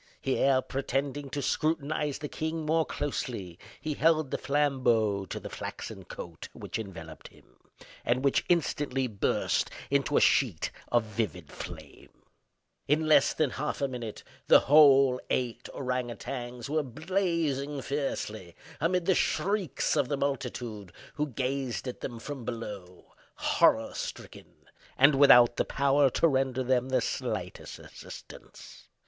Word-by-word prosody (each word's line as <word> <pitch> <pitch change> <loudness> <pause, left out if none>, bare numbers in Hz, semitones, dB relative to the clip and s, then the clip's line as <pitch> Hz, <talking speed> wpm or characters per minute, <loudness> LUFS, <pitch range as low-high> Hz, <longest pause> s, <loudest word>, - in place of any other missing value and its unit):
Here, 135 -1 +2
pretending 140 +1 -2
to 140 +1 -3
scrutinize 155 -1 0
the 150 - -5
king 160 +1 -3
more 160 +1 +2
closely, 115 - -4 0.2
he 155 +1 -3
held 155 -2 +2
the - - -1
flambeau 125 -8 +1
to - - -5
the - - -8
flaxen - - -7
coat 85 -2 -9
which - - -5
enveloped 80 -7 -8
him, - - -22 0.4
and 125 +2 +1
which 140 - +3
instantly 145 -6 +1
burst 105 -5 0 0.2
into - - +2
a - - +6
sheet - - +2 0.2
of 120 -1 +4
vivid 105 -8 -4
flame. - - -10 0.8
In 155 +3 +2
less 155 -1 +4
than 155 -5 +1
half 150 +2 -3
a 140 - +1
minute 120 -4 -6 0.2
the - - +8
whole 135 -3 +6
eight 120 -1 -2
ourang 125 -2 -2
outangs 120 0 -6
were 155 +2 +1
blazing 155 -1 -1
fiercely, 110 - -3 0.2
amid 175 +3 +1
the 190 - +4
shrieks 195 -5 0
of 145 -4 +2
the 145 - 0
multitude 120 -7 -3 0.2
who 150 0 -1
gazed 130 -1 -3
at 125 - -6
them 120 - -5
from 135 +2 -7
below, 105 -6 -7 0.2
horror - - +3
stricken, - - -8 0.3
and 140 +3 +7
without 125 -4 +7
the - - +3
power 140 0 +3
to 165 - +3
render 130 -3 0
them 130 0 +1
the 130 -1 +2
slightest - - -4
assistance. - - -12
135 Hz, 140 wpm, -29 LUFS, 120-150 Hz, 0.8 s, the